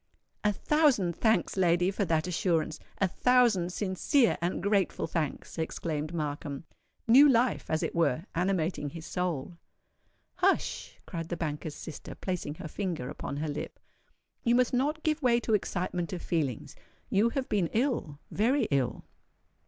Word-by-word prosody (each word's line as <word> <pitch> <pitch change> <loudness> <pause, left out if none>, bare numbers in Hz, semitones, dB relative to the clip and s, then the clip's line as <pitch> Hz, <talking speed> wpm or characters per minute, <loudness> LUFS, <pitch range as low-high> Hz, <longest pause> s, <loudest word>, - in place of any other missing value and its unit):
"A 210 - +3
thousand 240 - +2
thanks, 220 -1 +2
lady, 180 0 +3
for 200 +1 -1
that 160 -2 +1
assurance—a 175 0 -1
thousand 230 -5 +3
sincere 210 +7 +2
and 175 +1 -1
grateful 200 -2 +1
thanks!" 160 0 -3
exclaimed 155 -1 -3
Markham, 145 -3 -4 0.4
new 275 +6 +8
life 245 0 +2
as 155 - 0
it - - -2
were 165 -1 +1
animating 175 -4 0
his 160 +1 -9
soul. 175 -2 -3 0.8
"Hush!" - - 0
cried 165 -1 -5
the 175 - -3
banker's 150 -1 -4
sister, 160 - -8
placing 180 -5 -4
her 160 - -7
finger 170 -6 -3
upon 140 - -5
her 155 +2 -2
lip: 150 0 -5 0.6
"you 235 0 +3
must 250 0 +3
not 295 +5 0
give 310 0 0
way 240 -3 +4
to 225 - -1
excitement 180 -3 -1
of 180 - -5
feelings. 145 -8 -2 0.4
You 210 +4 +4
have 260 +2 -2
been 195 -5 +1
ill—very 230 - 0
ill." 135 -3 0
180 Hz, 145 wpm, -29 LUFS, 160-225 Hz, 0.8 s, new